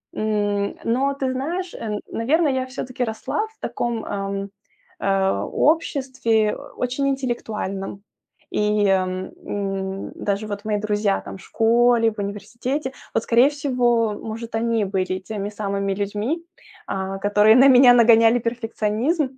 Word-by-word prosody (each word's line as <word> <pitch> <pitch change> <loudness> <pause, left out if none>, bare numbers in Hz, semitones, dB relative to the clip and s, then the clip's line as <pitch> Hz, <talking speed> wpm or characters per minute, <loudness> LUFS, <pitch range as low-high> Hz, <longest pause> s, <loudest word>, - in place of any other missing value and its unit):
М, 205 -2 0
но 265 +4 +1
ты 265 -2 -2
знаешь, 340 +8 -3
э, 210 -2 -4
наверное, 290 +6 +1
я 260 0 -1
всё-таки 255 -1 -4
росла 225 - -2
в 440 0 -18
таком, 235 -2 -3
ам, 195 0 -3 0.5
э, 195 0 +1
обществе 260 -8 +1 0.2
очень 255 +3 -1
интеллектуальном. 215 -7 -3 0.5
И, - - 0 0.3
э, 195 - +4 0.6
м, 195 -1 -3
даже 205 +1 -2
вот 205 0 -6
мои 210 -1 0
друзья 210 -1 0
там - - -8
в - - -15
школе, 230 0 +3
в 210 - -11
университете, 245 +7 -4 0.2
вот, - - +1
скорее 240 +3 +5
всего, 245 -6 +1
может, 225 +1 -6
они 230 -1 +1
были 185 -1 -2
теми 205 -2 -3
самыми 200 -2 -2
людьми, 205 - -2 0.5
а, 195 0 -3
которые 210 +2 +5
на 265 +2 +7
меня 250 -1 +8
нагоняли 230 0 +6
перфекционизм, 230 +5 -1
225 Hz, 135 wpm, -22 LUFS, 205-255 Hz, 0.6 s, меня